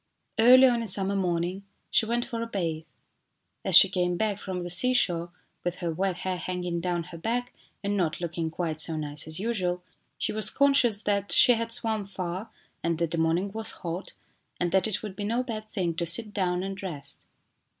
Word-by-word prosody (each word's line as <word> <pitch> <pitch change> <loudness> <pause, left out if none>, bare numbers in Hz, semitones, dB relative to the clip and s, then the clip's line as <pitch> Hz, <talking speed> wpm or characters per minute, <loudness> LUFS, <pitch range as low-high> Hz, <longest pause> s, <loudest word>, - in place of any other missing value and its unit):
Early 255 +3 +8
on 240 -2 +3
a 230 - -4
summer 195 0 +4
morning 180 0 -1 0.3
she 220 - +3
went 240 +1 0
for 230 -3 -5
a 230 - -3
bathe. 165 -7 -3 0.8
As - - +3
she - - +11
came 180 -1 -1
back 210 -1 -1
from 185 -3 -5
the 175 - -5
seashore 180 -5 +3 0.3
with 175 0 -2
her 170 -2 -3
wet 190 +2 -1
hair 185 0 -3
hanging 180 -1 -3
down 175 -1 -1
her 170 -1 -11
back 245 +6 -2 0.3
and 200 +1 -1
not 170 -5 -1
looking 170 -1 -3
quite 160 -1 -3
so 160 - +1
nice 150 -1 -1
as 155 +1 -2
usual, 185 -5 -2 0.3
she - - -1
was 215 0 +2
conscious 255 -7 +3
that 200 -1 -1
she 250 - +7
had 230 0 -2
swum 220 -3 -1
far 185 +1 -5 0.3
and 170 -1 0
that 165 -1 -1
the 170 - -1
morning 170 +5 +1
was 220 +1 -4 0.2
hot, 170 +3 -5 0.5
and 175 -1 0
that 190 +3 +2
it 215 -1 -3
would 205 -3 -6
be 205 - -5
no 230 +4 0
bad 215 -3 -6
thing 180 -6 -2
to 170 -1 -1
sit 210 +5 +1
down 180 -3 0
and 195 0 -5
rest. 165 -8 -7
185 Hz, 200 wpm, -27 LUFS, 170-220 Hz, 0.8 s, she